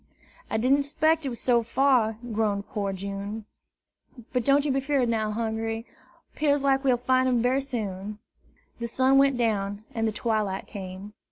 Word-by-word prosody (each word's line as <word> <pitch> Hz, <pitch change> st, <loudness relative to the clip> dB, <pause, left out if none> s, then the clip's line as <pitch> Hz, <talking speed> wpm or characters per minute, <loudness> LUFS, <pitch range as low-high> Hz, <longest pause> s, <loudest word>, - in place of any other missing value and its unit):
"I -, -, 0 dB
didn't'spect 285 Hz, +5 st, +2 dB
it -, -, 0 dB
was 235 Hz, -, -6 dB
so 240 Hz, -2 st, +3 dB
fur," 235 Hz, -2 st, +2 dB, 0.2 s
groaned 205 Hz, -2 st, 0 dB
poor 200 Hz, -2 st, -2 dB
June. 200 Hz, +3 st, -5 dB, 0.9 s
"But 250 Hz, -2 st, +1 dB
don't 280 Hz, +3 st, +3 dB
yer 290 Hz, -, +1 dB
be 270 Hz, -, +1 dB
'feard 270 Hz, -2 st, +1 dB
now, 220 Hz, -2 st, 0 dB
Hungry. 225 Hz, +1 st, -2 dB, 0.5 s
'Pears 285 Hz, -2 st, +1 dB
like 270 Hz, 0 st, +2 dB
we'll 255 Hz, -3 st, +3 dB
fine 255 Hz, +1 st, +2 dB
him 245 Hz, -2 st, +2 dB
berry 260 Hz, +2 st, +2 dB
soon." 210 Hz, -6 st, -4 dB, 0.6 s
The 235 Hz, -, -2 dB
sun 260 Hz, +3 st, +3 dB
went 275 Hz, -2 st, +4 dB
down, 205 Hz, -3 st, -1 dB
and 225 Hz, -1 st, 0 dB
the -, -, 0 dB
twilight 210 Hz, -3 st, -1 dB
came. 190 Hz, +1 st, -8 dB
230 Hz, 165 wpm, -26 LUFS, 210-270 Hz, 0.9 s, went